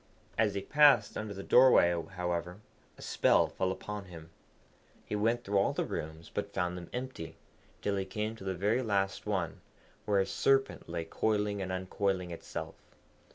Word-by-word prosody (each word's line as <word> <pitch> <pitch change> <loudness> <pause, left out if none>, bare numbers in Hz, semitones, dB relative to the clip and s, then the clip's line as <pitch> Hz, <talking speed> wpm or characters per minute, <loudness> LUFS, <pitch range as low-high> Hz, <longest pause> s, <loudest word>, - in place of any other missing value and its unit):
As 105 -3 +2
he 100 - -2
passed 145 -8 +5
under 105 -2 -4
the 100 - -6
doorway, 125 -9 +6 0.2
however, 90 0 -2 0.4
a - - -11
spell - - +3
fell 95 0 -1
upon 105 +1 -6
him. 85 -2 -11 0.7
He - - -3
went 115 +3 +1
through 100 0 +1
all 100 - +2
the - - -1
rooms, 80 +1 -6
but 100 0 -4
found 90 -1 0
them 90 -1 -8
empty, 125 -10 -6 0.5
till 100 -1 0
he 95 - -1
came 105 +3 -3
to 95 - -11
the 95 -1 -2
very 105 +7 +1
last 100 -4 -1
one, 90 -6 -2 0.4
where 100 -2 +2
a 95 - +3
Serpent 135 +7 +1
lay 85 -1 -3
coiling 105 +2 0
and 95 -1 -3
uncoiling 95 0 -1
itself. 85 - -6
100 Hz, 170 wpm, -31 LUFS, 90-105 Hz, 0.7 s, doorway